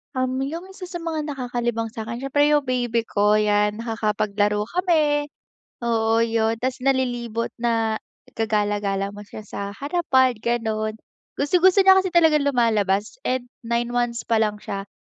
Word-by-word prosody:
Um, 255 +1 -1
'yung 330 +7 -5
isa 385 0 -12
sa 355 -1 -6
mga 320 -2 -3
nakakalibang 240 -3 -2
sa 220 0 -7
'kin 235 +2 -6
siyempre 275 +2 +1
'yung 290 -3 +2
baby 240 -2 0
ko 210 +1 +3
yan. 210 0 +1
Nakakapaglaro 210 -2 0
kami 305 -4 +1 0.5
oo 225 -1 +2
'yun 225 0 +1
tapos 260 0 -1
nalilibot 245 -3 -1
na 225 -2 0 0.3
gagala-gala 205 -2 -1
mo 205 - -11
siya 215 - -9
sa 210 - -8 0.2
harapan 280 -3 +2
ganon. 220 -2 -1 0.4
Gustong-gusto 365 +6 +4
niya 380 0 +7
kasi 375 - -1
talagang 320 -5 +4
lumalabas 215 - +1
and 250 -1 -2 0.2
9 235 +1 0
months 240 -1 -1
pa 225 -1 +1
lang 210 -1 +1
siya 195 0 -5
235 Hz, 150 wpm, -23 LUFS, 215-280 Hz, 0.5 s, niya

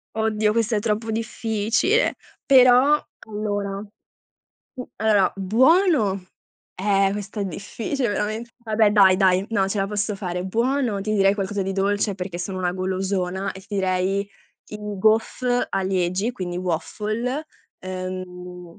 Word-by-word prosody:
Oddio, 215 -1 +1
questo 230 0 +1
è 210 - +2
troppo 220 +1 -1
difficile, 225 - 0 0.3
però 260 +2 +6 0.3
allora 205 -2 -3
mhmm, 210 0 -15 0.8
allora, 210 -3 +3
buono 225 - +3 0.5
eh, 195 0 +2
questa 205 +1 -5
è - - 0
difficile 230 - -3
veramen 215 +2 -2
vabbè 220 -2 +2
dai, 195 -3 +6
dai, 190 0 +3
no, 195 -4 +1
ce 200 +1 -2
la 195 - +1
posso 210 +1 -2
fare; 180 -2 -4
buono, 235 +1 0
ti 215 +2 -1
direi 195 -1 +4
qualcosa 200 0 -2
di 195 - -2
dolce, 200 +1 0
perché 180 -1 -5
sono 185 +2 -4
una 180 -1 0
golosona, 190 0 -2
e 190 - -11
direi 190 -1 0 0.5
i 210 - -7 0.2
gaufre 235 +4 +2
a 195 - 0
Liegi, 185 +4 0
quindi 180 -5 -5
waffle. 215 - -2 0.3
Ehm, 180 -1 -7
205 Hz, 135 wpm, -23 LUFS, 190-220 Hz, 0.8 s, però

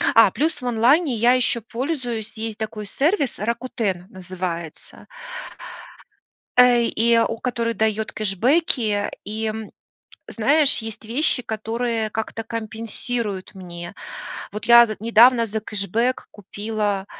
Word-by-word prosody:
А, - - +7
плюс 320 +2 -1
в - - -7
онлайне 250 +6 +3
я 235 +3 +4
еще 245 -2 +1
пользуюсь, 240 -2 -4
есть 220 -1 -5
такой 215 -1 -5
сервис 285 - 0
Rakuten 215 -4 -2
называется. 180 -4 -7 1.5
Э, 250 -1 +6
и 230 0 +2
у 230 0 0
который 235 -2 -1
дает 220 0 0
кэшбэки, 215 - +1
и, 215 +2 -4
м, 220 -1 -4 0.6
знаешь, 285 +6 +3
есть 225 0 -8
вещи, 250 +3 +1
которые 225 0 -2
как-то 220 +1 -4
компенсируют 225 -2 -4
мне. 175 -1 -8 0.6
Вот 210 +1 -6
я 235 0 +9
з 215 -2 -6
недавно 230 +2 +5
за 220 0 -3
кэшбэк 220 +4 -1
купила 205 -1 -3
225 Hz, 120 wpm, -22 LUFS, 210-240 Hz, 1.5 s, я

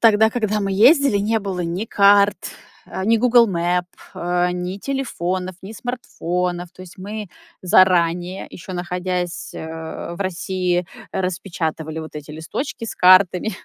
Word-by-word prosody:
тогда, 220 -1 +5
когда 215 -3 -1
мы 195 -1 -1
ездили, 270 - +5
не 220 +3 +1
было 195 -2 -4
ни 175 +5 -2
карт, 200 -1 +5 0.5
э, 190 - -5
ни 225 +3 +4
Google 235 -1 +5
Map, 175 0 0 0.3
э, 175 +1 0
ни 180 +2 -4
телефонов, 185 -9 -3
ни 195 +3 -9
смартфонов. 180 -7 -3
То 185 - -12
есть 180 0 -14
мы 210 +2 -6 0.3
заранее, 180 -1 +3
ещё 185 +2 -9
находясь, 180 0 -3
э, - - -6 0.6
в 195 - -12
России, 185 -1 -1 0.2
распечатывали 170 -4 -3
вот 160 -1 -8
эти 150 0 -8
листочки 230 - -5
с - - -5
картами, 185 +2 +5
185 Hz, 140 wpm, -21 LUFS, 175-210 Hz, 0.6 s, тогда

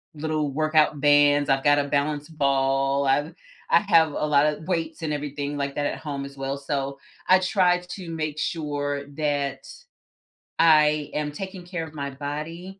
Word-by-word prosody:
little 155 -1 -2
workout 155 0 +2
bands, 145 0 +4
I've 135 0 +1
got 145 0 +5
a - - +1
balance 145 +1 -1
ball, 135 -2 +1
I've 145 +4 +1 0.4
I - - +6
have 165 -6 +4
a - - -1
lotta 150 0 +2
weights 165 -3 -2
and 155 -2 -2
everything 145 0 -4
like 140 -1 -2
that 145 - -1
at - - -4
home, 140 -3 -5
as 140 0 -11
well, 135 +1 -3
so, 140 -1 -3 0.3
I 185 0 +6
try 185 -1 +2
to 180 0 -9
make 155 -2 -3
sure 145 -3 -2
that 145 -3 -2 0.9
I 150 -2 +4
am 150 -1 -2
taking 190 +3 -7
care 175 -2 -4
of 155 - -13
my 140 -1 -4
body, 155 +7 -6
150 Hz, 170 wpm, -24 LUFS, 140-160 Hz, 0.9 s, I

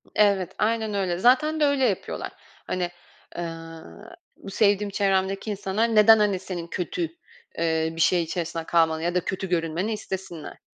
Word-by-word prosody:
Evet, 200 -4 +3
aynen 220 0 0
öyle. 190 -3 -1
Zaten 265 - +3
de 300 - +4
öyle 280 -2 +2
yapıyorlar. - - -2 0.4
Hani, 180 -1 -2 0.5
ııı, 165 - -8 0.2
bu 195 - -10
sevdiğim 205 0 +2
çevremdeki 195 +1 0
insanlar 210 +3 -1
neden, 220 +1 +7
hani, 205 -3 +2
senin 180 -3 -6
kötü, 180 +1 -4 0.6
ııı, 160 -1 0
bir 165 - -2
şey 175 +1 +4
içerisinde 165 0 -4
kalmanı 160 -1 +2
ya 175 +1 -1
da 180 - 0
kötü 190 -1 -3
görünmeni 170 +5 -1
istesinler? 190 -6 -7
190 Hz, 150 wpm, -25 LUFS, 170-210 Hz, 0.6 s, neden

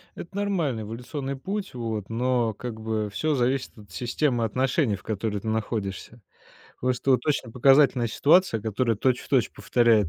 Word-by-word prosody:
Это 185 +3 -9
нормальный 170 - -1
эволюционный 130 +5 -5
путь, 195 +7 -4
вот, 110 -4 -4
но, 120 -1 +1
как 110 +1 -7
бы, 110 -1 -2
всё 150 +8 0
зависит 130 0 0
от 100 -4 -15
системы 120 - 0
отношений, 125 0 +1
в 95 - -13
которой 105 -1 -2
ты 110 - -8
находишься. 110 0 -3 0.6
Просто 125 +1 0
вот 125 +2 +3
очень 135 -6 0
показательная 135 -1 +5
ситуация, 150 - +3
которая 110 +1 0
точь-в-точь 125 +1 +1
повторяет, 115 -6 +3
120 Hz, 150 wpm, -26 LUFS, 110-135 Hz, 0.6 s, показательная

